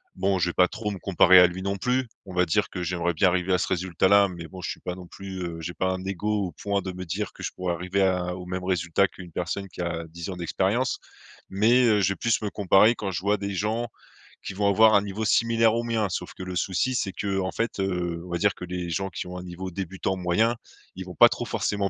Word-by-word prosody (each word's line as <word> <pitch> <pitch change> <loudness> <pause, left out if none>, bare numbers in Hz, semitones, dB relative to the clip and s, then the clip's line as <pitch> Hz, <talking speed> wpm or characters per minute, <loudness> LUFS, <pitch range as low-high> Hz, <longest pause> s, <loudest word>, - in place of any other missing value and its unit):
bon, 95 0 +1
je 90 -1 +1
vais - - -4
pas 90 - +4
trop 105 +2 -4
me 100 - -6
comparer 95 -1 +6
à 90 - +8
lui 90 +2 -6
non 100 0 -1
plus. 125 +4 0 0.2
On 95 - -9
va 90 0 +3
dire 80 - +1
que 90 - -5
j'aimerais 85 0 -1
bien 95 +4 +4
arriver 90 +1 0
à - - +4
ce - - -1
résultat-là, 95 +2 +3
mais 85 -3 -8
bon, 95 +2 -10
je - - -4
suis - - -5
pas 90 - -4
non 90 -1 -10
plus 95 +1 -8
heu, 85 -1 -5
j'ai 85 +2 -5
pas 95 - -1
un 95 0 -5
ego 100 +1 -1
au - - -11
point 100 +1 -2
de 95 - -4
me 90 0 -7
dire 80 - -3
que - - -12
je - - -3
pourrais 90 -1 -2
arriver 90 +3 0
à 90 -1 0
au 90 0 -8
même 90 0 -4
résultat 90 0 +1
qu'une 90 -2 -12
personne 90 +4 -3
qui 90 - -7
a 85 -1 -3
10 85 +3 -7
ans 95 - -5
d'expérience. 95 +8 0 0.5
Mais, 115 +6 +4
heu, 105 -3 +4
je 95 - +3
vais - - -11
plus 115 -2 +1
me 105 - -1
comparer 100 +2 +5
quand 100 - -4
je 90 - -3
vois 100 +2 +2
des 100 0 -4
gens 110 +5 -1 0.6
qui - - -5
vont 100 +1 0
avoir 110 +2 +6
un 100 - +5
niveau 105 +2 -4
similaire 115 0 +3
au 115 - 0
mien. 115 -3 0
Sauf 90 0 -4
que - - -8
le 90 0 -5
souci, 95 +8 0
c'est 100 -5 -1
que, 100 +1 -2
en 95 - -2
fait, 115 -2 -2
heu, 90 -3 -2
on 90 - -10
va 85 - 0
dire 100 +2 +2
que - - -10
les 90 -1 -4
gens 95 +3 -2
qui 90 - -6
ont 90 0 -7
un 90 - -7
niveau 90 +1 -6
débutant 95 +1 -3
moyen, 95 +6 +2 0.4
ils 95 0 -6
vont 90 -1 -9
pas - - +8
trop - - -4
forcément 100 -1 -1
95 Hz, 270 wpm, -26 LUFS, 90-100 Hz, 0.6 s, à